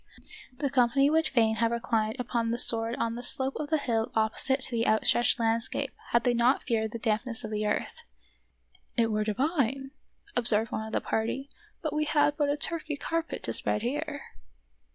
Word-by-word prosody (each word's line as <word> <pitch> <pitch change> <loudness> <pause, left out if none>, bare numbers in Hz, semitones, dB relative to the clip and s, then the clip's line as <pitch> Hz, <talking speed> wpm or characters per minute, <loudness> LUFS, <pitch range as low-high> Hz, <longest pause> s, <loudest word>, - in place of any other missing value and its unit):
The 280 -1 -2
company 275 +2 +3
would 320 0 +2
fain 225 -5 +2
have 230 0 +2
reclined 225 -2 -1
upon 235 -2 -1
the 235 - -1
sward 230 -1 +4
on 230 -2 -2
the 240 - -6
slope 265 +2 +2
of 295 - -5
the 315 - +2
hill 230 -6 -1
opposite 220 +5 +1
to 260 - +1
the 230 -1 0
outstretched 240 +3 +2
landscape 230 +4 -1 0.2
had 235 0 +2
they 245 - +2
not 240 +3 +2
feared 220 -3 -1
the 230 - -5
dampness 225 +1 0
of 215 - -6
the 210 0 -1
earth. - - -3 0.5
" - - -35
It 230 -1 +2
were 215 0 0
divine," 270 - -1 0.4
ob 240 -1 +1
served 220 0 +5
one 220 - -4
of 220 - -10
the - - 0
party, 260 +5 -3 0.3
"had 310 - -1
we 305 0 -1 0.3
but 290 -2 0
a 290 - 0
Turkey 310 -1 -2
carpet 330 +2 -3
to - - -2
spread 210 - 0
here." 285 +3 -3
235 Hz, 195 wpm, -28 LUFS, 225-275 Hz, 0.5 s, served